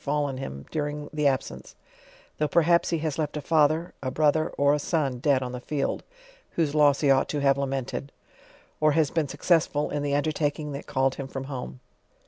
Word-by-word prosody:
fallen 145 -2 -1
him 70 - -6
during 150 -1 -3
the 150 -1 +2
abscence, 135 -1 -3 0.6
though 150 - +2
perhaps 170 +3 +3
ho 170 - +1
has 155 -1 -3
left 150 -1 -2
a - - -1
father, 155 +2 +2
a 130 - -2
brother, 155 +3 +2
or 140 0 +4
a 150 - +1
son 140 -5 -1
dead 135 -1 +2
on 125 - -4
the 125 - -5
field, 140 +2 -2 0.5
(whose 155 -4 0
loss 145 -2 +4
he 140 -2 +4
ought 135 0 +3
to 150 - -1
have 140 -1 +4
lamented) 135 0 -3 0.7
or 155 -1 +4
has 155 -2 +2
been 160 -3 0
successful 150 0 +1
in 145 - -1
the 140 0 0
undertaking 150 0 -1
that 140 +1 -7
called 130 0 +1
him 135 - -6
from 135 0 -5
home. 130 -2 -6
145 Hz, 195 wpm, -26 LUFS, 135-155 Hz, 0.7 s, or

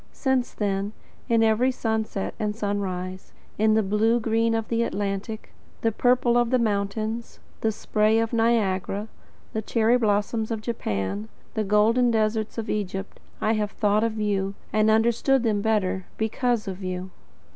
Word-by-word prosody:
Since 265 -3 0
then, 200 0 -1 0.4
in 230 -1 +4
every 225 +3 +3
sunset 220 -5 -2
and 210 -1 -1
sunrise, 190 -3 -3 0.3
in 215 0 +4
the 220 - +3
blue 215 +4 +2
green 225 0 +1
of 225 -1 -2
the 230 0 0
Atlantic, 205 0 -3 0.3
the 225 - +2
purple 245 +1 +3
of 240 -1 +2
the 255 - +3
mountains, 215 +1 -2 0.2
the 220 - +1
spray 215 +1 +1
of 225 +1 0
Niagara, 215 -3 +1 0.4
the 220 - -1
cherry 230 +3 +2
blossom 215 0 +1
of 225 -2 -2
Japan, 105 - -3 0.2
the 220 - 0
golden 215 +4 +3
deserts 220 -1 0
of 225 0 -3
Egypt, 195 -1 -3 0.2
I 220 - +2
have 210 -2 0
thought 210 +1 +1
of 225 -1 -1
you, 200 -2 0 0.2
and 215 0 +3
understood 235 +4 +3
them 215 -3 +1
better, 200 -4 0
because 225 0 0
of 190 0 -5
you. 185 0 -4
215 Hz, 155 wpm, -25 LUFS, 200-230 Hz, 0.4 s, in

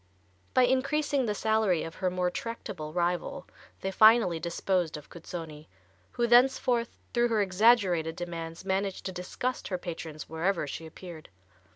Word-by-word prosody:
By 255 - +6
increasing 275 +1 +1
the 210 - -1
salary 220 -5 +1
of 165 - -6
her 185 - -1
more 180 0 -1
tractable 200 -8 -6
rival 175 +1 -1 0.4
they 190 - -2
finally 215 -4 +5
disposed 170 -1 -1
of 150 - -13
Cuzzoni, 160 -3 -8 0.5
who 240 - +1
thenceforth 240 -1 +3 0.2
through 240 0 +3
her 225 -2 +1
exaggerated 185 -5 +3
demands, 170 0 -6
managed 195 0 -1
to 190 - -2
disgust 185 +8 -4
her 185 - -2
patrons 160 -3 -7
wherever 165 +1 -1
she 160 +3 -6
appeared. 165 -1 -11
185 Hz, 145 wpm, -29 LUFS, 165-230 Hz, 0.5 s, By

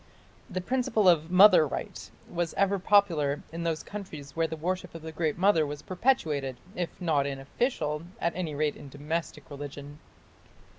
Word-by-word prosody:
The 185 -2 -3
principle 225 -2 +1
of 165 -2 +4
"mother 185 -3 +7
right" - - -6 0.2
was 170 -1 -3
ever 200 0 +2
popular 170 -8 +3
in 165 +1 -5
those 165 -2 -1
countries 155 -9 -8
where 165 0 +1
the 160 - -5
worship 180 +2 -3
of 165 - -8
the 160 - -6
Great 160 0 -1
Mother 185 -3 +4
was 145 -1 -5
perpetuated 155 - 0 0.2
if 175 -3 -4
not 155 -6 +1
in 140 -1 -3
official 150 - -1 0.2
at 170 - -1
any 170 -5 -3
rate 150 0 0
in 145 - -11
domestic 150 +6 -4
religion. 145 +1 -8
165 Hz, 165 wpm, -28 LUFS, 145-185 Hz, 0.2 s, mother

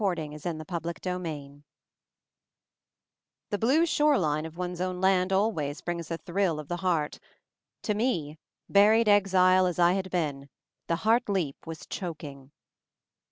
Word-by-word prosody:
MOVING 170 -6 -1
THE 160 +2 -4
MOUNTAIN 155 0 -8
49 170 0 -4
CHAPTER 180 +1 -4
III 145 -1 -9 1.9
THE 205 - 0
blue 275 - +3
shore 300 -3 +3
line 155 -2 0
of 160 +1 -13
one's 180 -1 -4
own 185 -1 -2
land 190 0 +2
always 190 -8 0
brings 170 -2 -4
a 165 - -2
thrill 175 -2 -1
of 150 - -9
the 175 - -2
heart; 175 -5 -1 0.6
to 210 - 0
me, 170 - -1 0.3
buried 215 +3 +5
exile 185 -2 +5
as 180 - -3
I 175 0 +5
had 190 -1 -2
been, 145 -6 -2 0.4
the 170 - +1
heart 230 +1 +3
leap 170 -7 -2
was 165 -1 -7
choking. 145 -6 -7
180 Hz, 155 wpm, -28 LUFS, 155-195 Hz, 1.9 s, buried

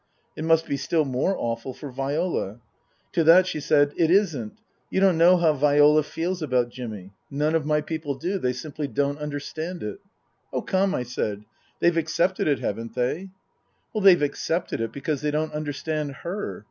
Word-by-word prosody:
" - - -43
It 155 - -4
must 165 0 +4
be 140 - -2
still 150 +3 +1
more 135 +9 0
awful 115 +2 -3
for 145 -3 -8
Viola." 135 - -2 0.5
To 165 - +2
that 170 +4 +7
she 160 - -3
said, 145 0 +3
" - - -19
It 165 -2 +3
isn't. 210 +3 +1 0.3
You - - 0
don't 190 -2 +4
know 175 +3 +6
how 165 -3 +3
Viola 150 +1 +5
feels 170 +4 -3
about 125 -5 +1
Jimmy. 105 -6 -8 0.2
None 150 +3 0
of 160 -2 0
my 150 0 +2
people 155 -2 -4
do. 180 +8 -2
They 125 -6 0
simply 145 +3 -5
don't 140 +1 -1
understand 155 +4 -5
it." 105 -1 -5 0.3
" - - -45
Oh, - - -1
come," 190 +1 +1
I 125 - -1
said, 105 -4 -3 0.2
" - - -37
they've 170 -1 +3
accepted 170 +3 +1
it, 145 -2 +3
haven't 115 +3 -4
they? 130 +10 -1 0.2
" - - -45
" - - -39
They've 185 -6 +6
accepted 160 0 -1
it 115 - -2
because 140 0 -3
they 150 - 0
don't 155 +1 -1
understand 150 0 -3
her. 190 +5 -4
150 Hz, 200 wpm, -25 LUFS, 135-170 Hz, 0.5 s, that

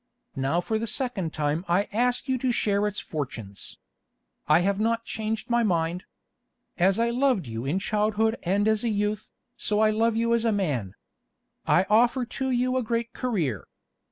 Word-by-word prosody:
Now 135 +6 0
for 220 +4 -1
the 230 - -3
second 225 - -2
time 150 +2 -1
I 180 +4 +2
ask 245 +4 +1
you 260 -1 0
to 255 0 +1
share 205 -3 +1
its 205 0 -3
fortunes. 115 - -6 0.7
I 155 +3 +5
have 200 +2 +1
not 230 +1 0
changed 220 0 -3
my 235 0 +2
mind. 175 -4 0 0.7
As 190 +3 +4
I 235 +1 +2
loved 250 - +2
you 115 +1 -5
in 150 +7 0
childhood 215 +2 +1
and 200 +4 +1
as 220 0 +2
a 235 - +1
youth, 210 -1 -1 0.3
so 210 -3 0
I 215 0 +4
love 225 +1 +1
you 230 +1 +1
as 235 -1 +2
a 230 - +2
man. 140 - -1 0.7
I 180 - +4
offer 240 +4 +3
to 265 +2 -3
you 255 +1 +1
a - - +1
great 230 0 -2
career. 165 - -2
215 Hz, 180 wpm, -26 LUFS, 175-230 Hz, 0.7 s, I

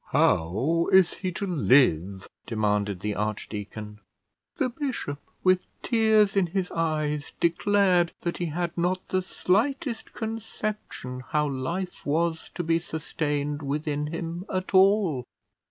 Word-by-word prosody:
"How 135 - +2
is 190 -2 +6
he 185 -1 -3
to 200 - -3
live?" 120 - +3 0.2
demanded 105 -3 0
the 105 +1 -1
archdeacon. 105 0 -4 0.6
The 270 -6 +1
bishop, 245 - -4 0.2
with 185 -1 +3 0.2
tears 220 -3 +4
in 195 -3 +3
his 185 +1 -2
eyes, 155 -3 -1
declared 180 0 +3
that 170 - -2
he 175 - -2
had 170 +2 -2
not 180 +2 -1
the 185 - +1
slightest 225 +7 0
conception 215 - -5
how 150 -1 +2
life 170 +8 -3
was 160 +2 0
to 175 - -2
be 165 0 +2
sustained 150 -2 -2
within 150 +1 -2
him 165 +2 -4
at 185 0 -3
all. 190 -8 +4
165 Hz, 125 wpm, -26 LUFS, 145-190 Hz, 0.6 s, is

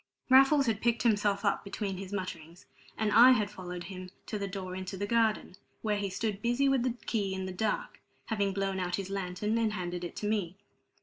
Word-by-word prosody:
Raffles 270 +2 +7
had 220 -3 0
picked 235 0 +1
himself 205 -3 +2
up 200 - +1
between 200 -1 -4
his 190 0 -7
mutterings, 175 -4 -6 0.3
and 215 -1 0
I 245 +4 +9
had 210 -4 0
followed 180 -1 -7
him 185 -1 -8 0.2
to 210 - -4
the 200 - -2
door 185 -1 -5
into 190 +1 -5
the 205 - -2
garden, 220 -3 +1 0.3
where 210 -2 +1
he 200 -1 -2
stood 200 +2 -3
busy 240 +4 +2
with 270 -2 +3
the 245 -1 0
key 200 -4 -1
in 190 0 -3
the 190 - -4
dark, - - -2 0.3
having 200 -3 0
blown 195 0 -1
out 180 -1 -1
his 195 -1 -5
lantern 195 +3 -1
and 220 -2 +1
handed 175 -2 -4
it 175 - -6
to 210 - -3
me. 200 -5 -1
200 Hz, 210 wpm, -30 LUFS, 185-225 Hz, 0.3 s, I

